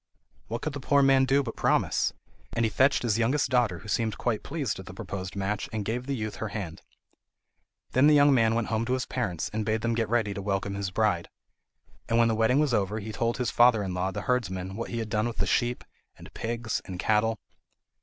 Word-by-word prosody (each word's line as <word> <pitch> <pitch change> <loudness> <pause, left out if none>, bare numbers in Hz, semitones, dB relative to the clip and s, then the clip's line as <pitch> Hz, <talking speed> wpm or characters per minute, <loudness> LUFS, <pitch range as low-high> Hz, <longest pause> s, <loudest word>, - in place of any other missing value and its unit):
What 115 +2 -4
could 155 - -2
the 145 - -5
poor 140 +1 +3
man 135 -1 +5
do 140 +1 +3
but 115 - -6
promise? - - +1 0.4
And 115 - +1
he - - +1
fetched 130 +5 +3
his 115 -2 +1
youngest 130 +4 +1
daughter, 120 -8 +2
who 105 - -12
seemed 110 0 -1
quite 115 -4 -1
pleased 140 - -3
at 95 - -10
the 90 - -9
proposed 95 -1 -6
match, 100 +1 -2
and 110 -2 -3
gave 125 +4 -3
the 140 - -1
youth 110 -3 -4
her 110 - -3
hand. 100 -6 -6 1.1
Then 130 +3 +5
the 150 - +6
young 145 -1 +6
man 115 -3 +3
went 115 -2 -1
home 110 0 0
to 125 - 0
his 130 0 -1
parents, 95 -10 -3
and 110 0 -1
bade 110 +1 0
them 115 0 0
get 115 -2 -1
ready 110 -3 +1
to 100 - -5
welcome 100 0 -2
his 100 -1 -3
bride. 95 -3 0 0.8
And 115 - +2
when 115 0 +4
the 110 - +1
wedding 115 +4 +3
was 150 -4 +2
over 105 -1 0
he 110 +1 -6
told 115 +2 -1
his 125 -4 -1
father 120 -2 +5
in 95 -2 -3
law, 90 +1 -1
the 95 - -4
herdsman, 95 -7 -2
what 115 - -4
he 120 - -4
had 110 -1 -3
done 110 +1 0
with 120 - -6
the 100 - 0
sheep, 120 +4 0 0.3
and - - -13
pigs, 115 0 -3
and 95 -2 -6
cattle. 110 +2 +2
115 Hz, 235 wpm, -27 LUFS, 100-125 Hz, 1.1 s, the